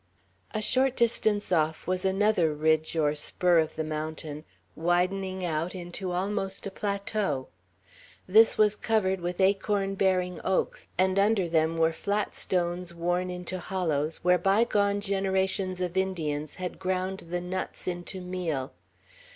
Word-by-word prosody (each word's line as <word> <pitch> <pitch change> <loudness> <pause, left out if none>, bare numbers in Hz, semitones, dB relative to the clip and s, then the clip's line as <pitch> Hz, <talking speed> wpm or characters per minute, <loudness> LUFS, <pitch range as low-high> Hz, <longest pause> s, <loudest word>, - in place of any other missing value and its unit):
A 215 - -2
short 260 +3 +2
distance 215 -4 +1
off 160 -2 +1
was 185 0 -1
another 190 -5 +2
ridge 155 +1 +1
or 150 -2 +3
spur 170 +3 +2
of 160 -1 -1
the 160 - -2
mountain, 155 0 -5 0.3
widening 185 +2 0
out 165 +2 -2
into 180 +1 -5
almost 195 +1 -2
a 200 - -4
plateau. 200 -8 -2 0.8
This 220 +4 +6
was 210 -1 +4
covered 190 -5 0
with 175 +1 -3
acorn 195 0 +2
bearing 185 -2 +1
oaks; 190 - -1
and 185 +1 +3
under 200 -2 +3
them 160 0 +1
were 165 0 +3
flat 205 +5 -1
stones 175 -1 -1
worn 175 +2 0
into 180 +1 -5
hollows, 165 -5 -2
where 180 0 +4
bygone 200 +1 +2
generations 190 -1 0
of 180 -1 -2
Indians 155 -6 -1
had 185 -1 -5
ground 185 +1 -1
the 175 +1 -2
nuts 180 +1 -5
into 180 +1 -4
meal. 175 -7 -3
185 Hz, 140 wpm, -28 LUFS, 165-195 Hz, 0.8 s, This